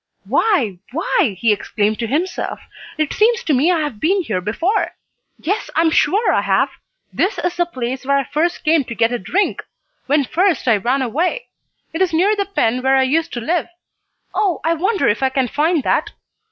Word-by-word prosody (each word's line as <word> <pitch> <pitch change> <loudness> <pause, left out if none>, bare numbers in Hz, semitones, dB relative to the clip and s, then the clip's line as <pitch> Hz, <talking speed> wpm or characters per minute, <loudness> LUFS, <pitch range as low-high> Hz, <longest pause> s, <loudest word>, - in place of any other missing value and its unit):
"Why 245 - +1
why!" 295 - 0
he 225 0 +3
exclaimed 210 +1 -1
to 230 - -2
himself: 330 +10 -2 0.4
"It 310 -2 -1
seems 465 +2 +2
to 310 - +1
me 285 +7 +3
I 335 -3 +1
have 295 -8 -4
been 375 - +1
here 205 - -2
before! 330 - -1 0.4
Yes, 405 +6 -2
I - - +4
am 325 -1 +3
sure 415 +8 +2
I - - +2
have. - - +2 0.4
This 395 - 0
is 355 0 -2
the 350 0 0
place 255 -4 -4
where 280 +1 +2
I 275 - +1
first 330 +6 -1
came 315 -2 +3
to 235 - -7
get 225 +1 +2
a 245 - -1
drink, 370 - 0 0.5
when 290 +1 +3
first 355 +3 0
I 225 -3 +5
ran 255 +6 0
away. 345 - -1 0.4
It 325 - -3
is 370 -3 +2
near 385 +6 +3
the 400 -1 -2
pen 255 - 0
where 265 +1 +3
I 265 - +4
used 320 +5 0
to 240 - -4
live! 335 +7 -1 0.7
Oh, 385 -5 0
I 330 - +2
wonder 380 +5 0
if 210 - +1
I 265 - +2
can 260 -1 0
find 305 +4 +1
that?" - - +1
310 Hz, 205 wpm, -19 LUFS, 250-360 Hz, 0.7 s, I